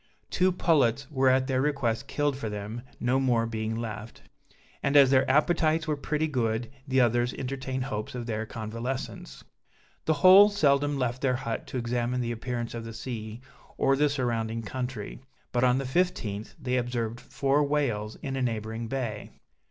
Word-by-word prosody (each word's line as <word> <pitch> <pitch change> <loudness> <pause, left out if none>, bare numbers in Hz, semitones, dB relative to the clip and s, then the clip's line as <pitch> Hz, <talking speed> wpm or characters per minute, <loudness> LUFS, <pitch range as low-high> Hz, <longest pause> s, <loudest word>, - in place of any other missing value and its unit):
Two 185 +1 +3
pullets 140 -8 +2
were 135 -2 +3
at 130 0 +3
their 130 -1 0
request 140 -3 0
killed 145 -2 0
for 115 -5 -4
them, 105 +3 -5 0.2
no 125 +2 +2
more 120 -4 +2
being 110 -1 -3
left; 110 -1 -6 0.6
and 140 +1 +3
as 135 -2 +7
their 130 -1 +4
appetites 155 +2 +3
were 155 - +1
pretty 150 +2 -1
good, 115 -5 -1 0.2
the 130 0 +2
others 120 0 +2
entertained 130 0 -3
hopes 105 -2 -4
of 120 -1 -4
their 110 -1 -3
convalescence. 115 - -5 0.6
The 160 - +3
whole 195 +3 +10
seldom 145 -7 +2
left 125 -1 -1
their 130 -2 +2
hut 115 -2 -4
to - - -4
examine 120 +1 -1
the 120 -1 -2
appearance 120 0 -4
of 115 -1 -5
the 115 0 -7
sea, 110 -2 -6 0.4
or 135 - +3
the 145 +1 +3
surrounding 115 -4 -1
country; 125 -1 -5 0.3
but, 120 0 +1
on 125 0 +4
the 135 - -2
15th, 125 - -1
they 130 -3 -1
observed 120 -2 -2
four 140 +3 +1
whales 125 -8 -1
in 135 -1 -3
a 135 - -2
neighboring 115 -1 -2
bay. 115 -4 -4
125 Hz, 170 wpm, -28 LUFS, 115-140 Hz, 0.6 s, whole